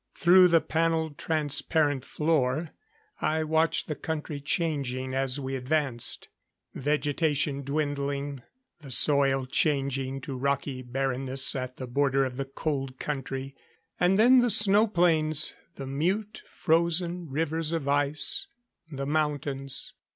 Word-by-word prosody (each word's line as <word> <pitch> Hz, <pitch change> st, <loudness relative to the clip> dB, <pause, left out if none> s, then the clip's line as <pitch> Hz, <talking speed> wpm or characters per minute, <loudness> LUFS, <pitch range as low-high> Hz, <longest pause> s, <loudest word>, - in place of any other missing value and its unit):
Through 180 Hz, +1 st, +6 dB
the 165 Hz, -2 st, +4 dB
panelled 160 Hz, -2 st, -1 dB
transparent 150 Hz, -2 st, +1 dB
floor, 150 Hz, 0 st, 0 dB, 0.5 s
I 160 Hz, +1 st, 0 dB
watched 160 Hz, +1 st, +1 dB
the 155 Hz, -, -2 dB
country 150 Hz, -1 st, -5 dB
changing 140 Hz, -4 st, -2 dB
as 135 Hz, 0 st, 0 dB
we 135 Hz, -1 st, -4 dB
advanced; 130 Hz, -2 st, -1 dB, 0.5 s
vegetation 145 Hz, 0 st, 0 dB
dwindling; 140 Hz, -1 st, -3 dB, 0.4 s
the 145 Hz, -4 st, -12 dB
soil 135 Hz, 0 st, +3 dB
changing 135 Hz, -1 st, 0 dB
to 135 Hz, 0 st, -6 dB
rocky 140 Hz, 0 st, -2 dB
barrenness 130 Hz, +1 st, 0 dB
at 130 Hz, -1 st, -5 dB
the 130 Hz, -, -6 dB
border 135 Hz, +2 st, +1 dB
of 130 Hz, -1 st, -6 dB
the 135 Hz, -, -3 dB
Cold 135 Hz, -1 st, -4 dB
Country. 135 Hz, -1 st, -5 dB, 0.4 s
And 180 Hz, +2 st, +3 dB
then 250 Hz, +4 st, +6 dB
the 245 Hz, 0 st, +2 dB
snow 210 Hz, +1 st, +5 dB
plains, 160 Hz, -5 st, +2 dB, 0.2 s
the 135 Hz, -, -7 dB
mute 190 Hz, +11 st, -2 dB
frozen 170 Hz, 0 st, 0 dB
rivers 160 Hz, +2 st, -1 dB
of 165 Hz, -4 st, -3 dB
ice, 145 Hz, -, +2 dB, 0.4 s
the 140 Hz, -1 st, -4 dB
mountains. 145 Hz, -2 st, -2 dB
145 Hz, 120 wpm, -27 LUFS, 135-160 Hz, 0.5 s, Through